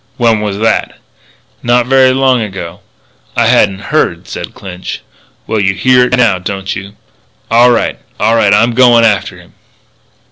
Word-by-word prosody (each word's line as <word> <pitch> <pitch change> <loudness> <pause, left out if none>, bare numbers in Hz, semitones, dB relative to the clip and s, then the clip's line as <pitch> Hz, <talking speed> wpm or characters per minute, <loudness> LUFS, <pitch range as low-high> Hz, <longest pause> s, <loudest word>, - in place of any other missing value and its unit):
"When 115 -3 +1
was 105 -2 -3
that?" 115 +1 -1 0.6
"Not 120 0 +1
very 130 0 +4
long 130 -2 +1
ago." 95 -4 -7 0.6
"I - - +2
hadn't 100 -2 +1
heard," - - 0
said - - -8
Clinch. 95 -2 -8 0.4
"Well, 110 - -2
you 95 -1 0
hear 125 +5 +3
it 125 0 0
now, 110 -7 +2
don't 95 +1 -5
you? 100 +2 -9 0.6
All 120 +2 +5
right. 120 - 0 0.2
All 110 +2 +2
right; 105 -3 +2
I'm 115 +4 +3
going 120 -1 +4
after 105 -2 0
him." - - -18
110 Hz, 155 wpm, -12 LUFS, 100-120 Hz, 0.6 s, All